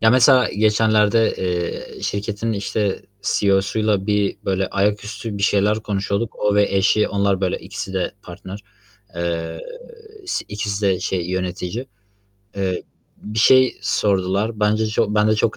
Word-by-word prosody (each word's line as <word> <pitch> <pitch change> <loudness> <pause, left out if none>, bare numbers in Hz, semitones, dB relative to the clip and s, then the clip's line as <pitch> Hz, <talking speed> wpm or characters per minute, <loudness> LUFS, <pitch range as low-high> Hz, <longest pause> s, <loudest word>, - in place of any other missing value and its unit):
Ya, 110 - +5
mesela 130 +1 +5
geçenlerde, 110 +1 +3
eee, 90 -2 -3
şirketin, 105 +2 -2
işte, 100 -1 -2 0.2
CEO'suyla 100 0 +1
bir, 105 -1 +1
böyle, 95 0 0
ayaküstü 105 +1 -2
bir - - -4
şeyler 105 +1 +2
konuşuyorduk. 100 +1 -2
O 105 -1 +1
ve 105 0 +4
eşi, 105 +2 +3
onlar, 100 -1 +1
böyle, 95 -2 0
ikisi 95 - -7
de 95 -2 -1
partner, 95 +3 -9 0.5
eee, 85 -1 -3 0.7
si - - -2
ikisi 105 0 -3
de 95 -1 +1
şey, 90 -1 -2
yönetici. 95 +6 -3 0.7
Eee, 95 -2 -1 0.3
bir 105 +1 -6
şey 130 +3 +5
sordular. 100 +2 0
Bence 110 +1 +2
çok 105 -1 0
ben 105 0 +3
de 110 - +4
çok 110 +1 +1
105 Hz, 140 wpm, -21 LUFS, 95-110 Hz, 0.7 s, Ya